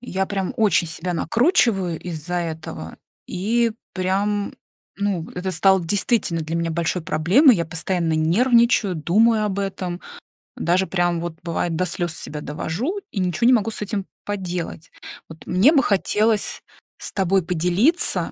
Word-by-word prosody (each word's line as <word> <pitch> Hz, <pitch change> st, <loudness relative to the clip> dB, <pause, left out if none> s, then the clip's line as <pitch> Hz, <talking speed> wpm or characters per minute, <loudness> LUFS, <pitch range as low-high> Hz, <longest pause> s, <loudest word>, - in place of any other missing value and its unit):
Я 190 Hz, -5 st, -2 dB
прям 195 Hz, -2 st, -2 dB
очень 200 Hz, -6 st, +3 dB
себя 175 Hz, +2 st, -4 dB
накручиваю 195 Hz, -, +2 dB
из-за 175 Hz, -1 st, -5 dB
этого, 160 Hz, -, -5 dB, 0.3 s
и, 225 Hz, +5 st, 0 dB, 0.2 s
прям, 200 Hz, +2 st, -1 dB, 0.4 s
ну, 200 Hz, -5 st, -1 dB
это 180 Hz, +1 st, -3 dB
стало 190 Hz, +2 st, +4 dB
действительно 195 Hz, -1 st, 0 dB
для 160 Hz, +2 st, -3 dB
меня 170 Hz, 0 st, -1 dB
большой 170 Hz, +2 st, -1 dB
проблемой. 190 Hz, -, +4 dB
Я 170 Hz, -, -1 dB
постоянно 165 Hz, +1 st, -1 dB
нервничаю, 215 Hz, +5 st, +3 dB
думаю 215 Hz, +7 st, +3 dB
об 200 Hz, -2 st, -2 dB
этом, 190 Hz, -3 st, -3 dB, 0.6 s
даже, 180 Hz, +3 st, +1 dB
прям 175 Hz, -2 st, 0 dB
вот, 170 Hz, -1 st, -6 dB
бывает, 170 Hz, -1 st, -2 dB
до 185 Hz, -, 0 dB
слёз 175 Hz, -1 st, -2 dB
себя 150 Hz, -1 st, -6 dB
довожу 175 Hz, -, -3 dB
и 200 Hz, -, -3 dB
ничего 185 Hz, +5 st, +1 dB
не 255 Hz, -, +6 dB
могу 225 Hz, -2 st, +2 dB
с -, -, -6 dB
этим 205 Hz, -1 st, -3 dB, 0.2 s
поделать. 180 Hz, -5 st, -5 dB, 0.4 s
Вот 160 Hz, 0 st, -13 dB
мне 190 Hz, +11 st, +5 dB
бы 285 Hz, -, +5 dB
хотелось 210 Hz, 0 st, +1 dB, 0.4 s
с -, -, -5 dB
тобой 195 Hz, -1 st, +1 dB
поделиться 180 Hz, -, +1 dB
185 Hz, 145 wpm, -22 LUFS, 170-210 Hz, 0.6 s, не